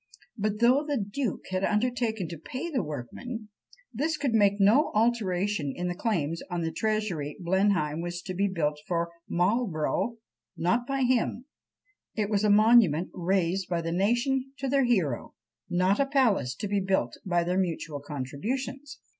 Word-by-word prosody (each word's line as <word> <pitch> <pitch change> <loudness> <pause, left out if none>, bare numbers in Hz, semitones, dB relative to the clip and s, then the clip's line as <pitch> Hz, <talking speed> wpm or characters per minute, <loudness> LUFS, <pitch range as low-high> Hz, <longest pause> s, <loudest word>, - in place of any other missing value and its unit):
But 210 -1 -1
though 255 +5 +5
the 295 -2 -1
duke 210 +2 -3
had 185 +1 -1
undertaken 220 -3 0
to 170 -3 -7
pay 295 - -5
the 260 -6 +1
workmen, 205 - -6 0.4
this 305 +7 -1
could 275 -6 -1
make 205 -2 +4
no 215 +10 +5
alteration 205 -8 +1
in 180 0 -2
the - - -1
claims 170 -5 -1
on 175 -1 -2
the 165 0 -1
Treasury. 190 -6 -2
Blenheim 180 -4 +1
was 175 +1 -5
to 185 - -5
be 200 +3 +1
built 150 -6 -1
for 170 -1 -1 0.2
Marlborough, 195 +3 0 0.4
not 235 +8 +1
by 275 -1 -1
him; 250 0 +1 0.7
it 215 -1 -1
was 205 0 +2
a 210 - +3
monument 205 -6 +5
raised 185 0 0
by 170 -2 -1
the 165 - -2
nation 245 +8 +1
to 275 - -3
their 275 0 +3
hero, 180 - 0 0.3
not 185 +3 +2
a 275 - +3
palace 235 - +2
to 205 - -4
be 200 0 +1
built 190 -11 0
by 175 -2 +1
their 180 +2 0
mutual 165 -5 -2
contributions. 235 - -4
200 Hz, 165 wpm, -28 LUFS, 170-240 Hz, 0.7 s, though